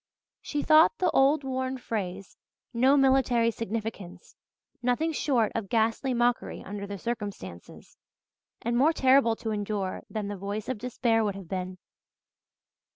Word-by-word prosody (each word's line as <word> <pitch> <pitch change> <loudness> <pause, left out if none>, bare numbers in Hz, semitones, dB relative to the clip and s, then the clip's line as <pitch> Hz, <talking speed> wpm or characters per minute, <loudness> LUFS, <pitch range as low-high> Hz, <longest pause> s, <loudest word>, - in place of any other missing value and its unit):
She 295 -1 -3
thought 315 +9 +5
the 365 - +1
old 280 +2 +3
worn 260 0 -2
phrase 195 -6 -5 0.4
'no 260 +4 +4
military 260 -4 +3
significance' 220 -4 -6 0.5
nothing 250 +7 +1
short 250 -8 +1
of 215 -4 -4
ghastly 230 +3 +1
mockery 240 0 0
under 200 +1 -6
the 200 0 -6
circumstances, 200 - -7 0.7
and 235 +1 0
more 290 +7 +4
terrible 260 -5 +4
to 220 0 -4
endure 205 -2 -3
than 215 -2 -4
the 205 - -4
voice 200 +2 -5
of 255 -4 -3
despair 235 -2 +1
would 205 -2 -1
have 195 -3 -9
been. 185 0 -4
230 Hz, 140 wpm, -27 LUFS, 205-260 Hz, 0.7 s, thought